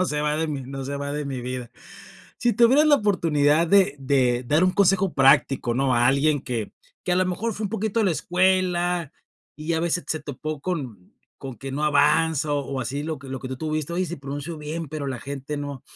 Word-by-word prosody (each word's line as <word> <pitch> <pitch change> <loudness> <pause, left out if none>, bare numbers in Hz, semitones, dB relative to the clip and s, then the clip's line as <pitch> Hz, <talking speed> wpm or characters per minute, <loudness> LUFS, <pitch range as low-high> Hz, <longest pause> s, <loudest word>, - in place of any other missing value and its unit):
no - - +3
se 150 -4 -2
va 150 0 0
de 160 +1 0
mi 145 -4 -4
no 135 +1 -6
se 140 +1 -4
va 140 0 -4
de 150 0 -3
mi 135 -2 -4
vida. 125 -1 -5 0.7
Si 240 -1 +2
tuvieras 260 +7 +5
la 295 -1 +6
oportunidad 165 - +2
de 190 -3 +4
de 130 -2 +1
dar 155 +7 +3
un 185 - +4
consejo 195 -1 +3
práctico, 135 -3 +3
¿no?, 135 0 +1
a 120 +1 +3
alguien 140 +3 +2
que 120 -5 -4 0.3
que 180 - 0
a - - +2
lo 185 - +3
mejor 215 +5 -2
fue 215 - -4
un 200 - -3
poquito 220 +1 -1
a - - +2
la 195 - +3
escuela, 180 0 +1 0.4
y 155 +3 -3
a 160 - +1
ve 170 +1 -1
se 180 - -1
se 155 - -2
topó 150 +1 -6
con 135 - -5 0.3
con 130 -3 -8
que 135 +5 -7
no 145 +3 -1
avanza 155 0 +3
o 140 -2 -2
así 135 +4 -3
lo 155 0 -4
que 135 0 -12
lo 130 0 -4
que 130 - -6
tú 130 - -5
tuviste, 155 +2 -3
oye, 185 +2 0
sí 175 0 -5
pronuncio 145 +4 -6
bien, 155 +1 -5
pero 150 -1 -5
la 130 -2 -3
gente 140 +1 -5
no, 145 -2 -6
150 Hz, 235 wpm, -24 LUFS, 135-175 Hz, 0.7 s, la